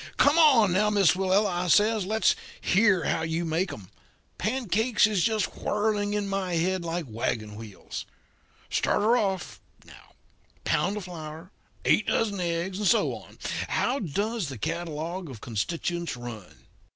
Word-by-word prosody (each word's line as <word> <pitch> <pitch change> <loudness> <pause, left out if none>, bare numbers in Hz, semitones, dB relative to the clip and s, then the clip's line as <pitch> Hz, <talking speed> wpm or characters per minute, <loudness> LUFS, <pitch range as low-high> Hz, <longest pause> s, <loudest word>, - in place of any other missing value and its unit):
'Come, 285 - +5
now, 210 +3 +3
Miss 200 -6 +4
Willella,' 190 -1 +1
I - - -3
says; 210 +2 +3
'let's 220 +2 +3 0.2
hear 195 -3 +3
how 160 - 0
you 165 +1 -1
make 165 +3 0
'em. 100 -2 -10 0.5
Pancakes 225 -1 +2
is 210 -5 +1
just 220 -3 0
whirling 210 -1 0
in 205 -1 -1
my 195 -3 -2
head 180 +2 0
like 170 0 -3
wagon 110 -1 -3
wheels. 105 -2 -8 0.7
Start - - +1
her 230 +3 +4
off, 195 -5 -2 0.2
now - - -16 0.5
pound 195 +4 +1
of 210 - -5
flour, 165 0 -8 0.3
eight 210 - +3
dozen 205 -4 0
eggs, 175 +2 -2
and 210 - +1
so - - +3
on. - - -11 0.3
How 265 +3 0
does 205 +2 -2
the 135 - -7
catalogue 165 - -4
of 125 -5 -9
constituents 165 +8 -3
run?' 115 -6 -10
185 Hz, 150 wpm, -27 LUFS, 165-210 Hz, 0.7 s, Come